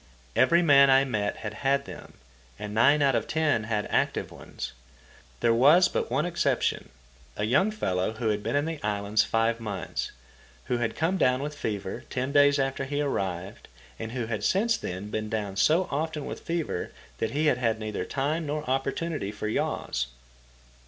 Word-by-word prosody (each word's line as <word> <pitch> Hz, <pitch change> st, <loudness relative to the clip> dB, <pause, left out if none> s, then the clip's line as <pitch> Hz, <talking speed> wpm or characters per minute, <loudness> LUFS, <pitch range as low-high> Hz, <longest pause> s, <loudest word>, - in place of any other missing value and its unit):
Every 170 Hz, +1 st, +4 dB
man 140 Hz, -3 st, +7 dB
I 135 Hz, 0 st, +6 dB
met 105 Hz, -6 st, -1 dB
had 105 Hz, -1 st, -6 dB
had 140 Hz, +4 st, 0 dB
them, -, -, -10 dB, 0.4 s
and 105 Hz, 0 st, -6 dB
nine 140 Hz, +7 st, +4 dB
out 135 Hz, -1 st, +4 dB
of -, -, 0 dB
ten 155 Hz, -9 st, +1 dB
had 105 Hz, -2 st, -1 dB
active -, -, 0 dB
ones. -, -, -7 dB, 0.7 s
There 115 Hz, -1 st, +4 dB
was 150 Hz, +10 st, +6 dB
but -, -, -2 dB
one 135 Hz, +6 st, +1 dB
exception, 175 Hz, -1 st, 0 dB, 0.5 s
a -, -, -1 dB
young 140 Hz, -, +3 dB
fellow 95 Hz, -, -1 dB
who 110 Hz, 0 st, -1 dB
had 105 Hz, -1 st, 0 dB
been -, -, -2 dB
in 145 Hz, +1 st, +2 dB
the 160 Hz, -2 st, -4 dB
islands 105 Hz, -1 st, +1 dB
five 115 Hz, +1 st, +1 dB
months, 105 Hz, -4 st, -4 dB, 0.5 s
who 125 Hz, -, 0 dB
had 115 Hz, -2 st, -1 dB
come 170 Hz, +4 st, 0 dB
down 130 Hz, -4 st, +2 dB
with 150 Hz, +1 st, -4 dB
fever 100 Hz, -7 st, -4 dB
ten 130 Hz, +1 st, -2 dB
days 145 Hz, 0 st, +5 dB
after 135 Hz, 0 st, -1 dB
he 145 Hz, +1 st, -2 dB
arrived, 95 Hz, -10 st, -3 dB, 0.3 s
and 110 Hz, +1 st, -5 dB
who 125 Hz, -3 st, -2 dB
had 110 Hz, -2 st, -3 dB
since 225 Hz, +4 st, +2 dB
then 95 Hz, -, -6 dB
been 110 Hz, 0 st, -3 dB
down 105 Hz, -3 st, -3 dB
so 160 Hz, -, +3 dB
often 150 Hz, +1 st, -2 dB
with -, -, -6 dB
fever 165 Hz, -, -3 dB, 0.3 s
that 110 Hz, -, 0 dB
he 150 Hz, +7 st, 0 dB
had 130 Hz, -5 st, +3 dB
had 115 Hz, -3 st, +1 dB
neither 110 Hz, -1 st, -3 dB
time 150 Hz, +4 st, -2 dB
nor 150 Hz, +1 st, -3 dB
opportunity 135 Hz, -2 st, -1 dB
for 105 Hz, 0 st, -5 dB
yaws. 65 Hz, -, -1 dB
130 Hz, 180 wpm, -27 LUFS, 110-150 Hz, 0.7 s, man